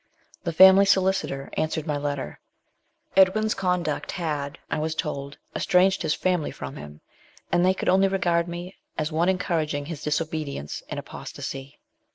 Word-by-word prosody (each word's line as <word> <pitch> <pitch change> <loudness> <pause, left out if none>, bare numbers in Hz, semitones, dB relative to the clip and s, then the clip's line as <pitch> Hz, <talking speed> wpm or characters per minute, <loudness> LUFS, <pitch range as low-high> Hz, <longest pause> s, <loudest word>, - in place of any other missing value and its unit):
The 170 - -1
family 190 +4 +8
solicitor 190 -8 +1
answered 155 -1 -1
my 150 -3 -1
letter. 145 - -3 0.8
Edwin's 205 +3 +4
conduct 180 -5 -1
had, 150 -5 -3
I - - -2
was 155 +1 -2
told, 140 -4 -4 0.2
estranged 190 +1 +3
his 150 - +1
family 180 -4 0
from 70 0 -7
him, 75 +1 -10 0.5
and 175 0 +3
they 185 +1 +4
could - - -4
only 190 +1 +5
regard 175 -3 +1
me 175 +2 -7 0.2
as 155 +1 -1
one 165 +3 +2
encouraging 160 -6 -1
his 155 -1 -6
disobedience 150 - -3
and - - -3
apostasy. 135 +1 -7
165 Hz, 150 wpm, -25 LUFS, 145-185 Hz, 0.8 s, family